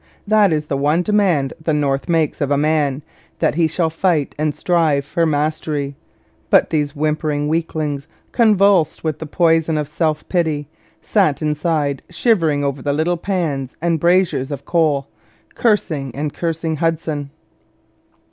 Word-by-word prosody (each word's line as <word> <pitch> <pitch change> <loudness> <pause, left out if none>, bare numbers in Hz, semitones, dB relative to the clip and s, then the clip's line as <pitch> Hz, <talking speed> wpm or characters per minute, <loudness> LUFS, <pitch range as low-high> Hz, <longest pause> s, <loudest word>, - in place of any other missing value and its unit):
That 210 -2 +4
is 155 -1 0
the 140 -2 -2
one 150 +5 +2
demand 180 -10 +1
the 155 -1 +1
North 140 -1 -1
makes 160 -3 +1
of 140 - 0
man 150 -2 +1 0.3
that - - +1
he 165 +1 +2
shall 160 0 -1
fight 165 -3 0
and 150 0 -1
strive 160 -6 +1
for 165 +3 0
mastery; 150 -1 -1 0.5
but - - +4
these 150 -2 0
whimpering 150 0 -1
weaklings, 155 -3 -2 0.2
convulsed 200 - +3
with 155 -2 -2
the 160 - -6
poison 165 0 +2
of 150 -1 -2
self 155 0 -1
pity, 155 -5 -1 0.4
sat 175 -8 +1
inside 150 -2 0
shivering 165 - +1
over 140 -1 -2
the 145 +1 -1
little 160 +4 +1
pans 160 -8 -3
and 165 0 0
braziers 170 -5 +2
of 140 -2 -6
coal, 155 -5 +1 0.5
cursing 155 - 0
and 145 +1 -3
cursing 165 -1 -2
Hudson. 160 -3 -2
155 Hz, 145 wpm, -19 LUFS, 145-170 Hz, 0.5 s, That